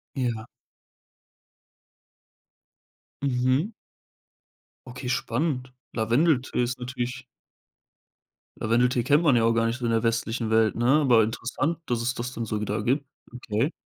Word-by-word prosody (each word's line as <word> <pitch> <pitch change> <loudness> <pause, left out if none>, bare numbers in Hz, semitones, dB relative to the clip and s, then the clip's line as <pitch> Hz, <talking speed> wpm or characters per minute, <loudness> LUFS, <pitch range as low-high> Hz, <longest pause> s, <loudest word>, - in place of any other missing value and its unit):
Ja. 120 -4 -2 2.8
Mhm. 130 - +1 1.1
Okay, 125 0 -7
spannend. 125 +1 -1 0.2
Lavendeltee 125 +3 +2
ist 125 +1 -3
natürlich 125 +1 -4 1.3
Lavendeltee 120 +2 +2
kennt 145 +5 +3
man 145 -6 +4
ja 115 - +3
auch 115 - +4
gar 115 0 +2
nicht 115 +2 -1
so 120 - -6
in - - +1
der 115 0 +2
westlichen 115 0 -1
Welt, 110 -1 +3
ne, 120 - -1 0.2
aber 125 -6 +5
interessant, 130 +9 -2
dass 120 -1 -1
es 125 +1 0
das 125 +1 -5
dann 115 - -3
so 105 -1 -3
wieder 105 0 -2
gibt. 135 +3 0 0.3
Okay. 125 +3 -1
125 Hz, 130 wpm, -26 LUFS, 115-130 Hz, 2.8 s, aber